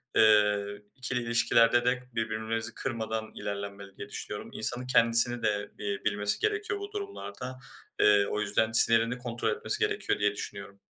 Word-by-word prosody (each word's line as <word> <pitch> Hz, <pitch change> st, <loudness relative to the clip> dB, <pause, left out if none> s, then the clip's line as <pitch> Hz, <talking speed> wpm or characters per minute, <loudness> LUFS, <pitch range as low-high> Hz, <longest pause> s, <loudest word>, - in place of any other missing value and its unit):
eee, 105 Hz, -1 st, +3 dB
ikili 130 Hz, -2 st, -2 dB
ilişkilerde 115 Hz, +1 st, +3 dB
de 125 Hz, 0 st, +1 dB
birbirimizi 110 Hz, 0 st, -3 dB
kırmadan 110 Hz, -3 st, -4 dB
ilerlenmeli 100 Hz, -1 st, -7 dB
diye 100 Hz, -, -8 dB
düşünüyorum. 105 Hz, 0 st, -5 dB
İnsanın 120 Hz, +3 st, -1 dB
kendisini 115 Hz, 0 st, +3 dB
de, 105 Hz, -1 st, -1 dB
eee, 100 Hz, -1 st, -2 dB
bilmesi 105 Hz, -1 st, +1 dB
gerekiyor 420 Hz, 0 st, -1 dB
bu 405 Hz, +1 st, -7 dB
durumlarda. 130 Hz, -, -7 dB, 0.4 s
Eee, 100 Hz, -1 st, +5 dB
o 105 Hz, -, -2 dB
yüzden 105 Hz, +2 st, +1 dB
sinirini 115 Hz, +1 st, +5 dB
kontrol 120 Hz, -1 st, -3 dB
etmesi -, -, -1 dB
gerekiyor, -, -, 0 dB
diye 105 Hz, 0 st, +2 dB
düşünüyorum. 100 Hz, 0 st, -7 dB
110 Hz, 145 wpm, -28 LUFS, 105-120 Hz, 0.4 s, Eee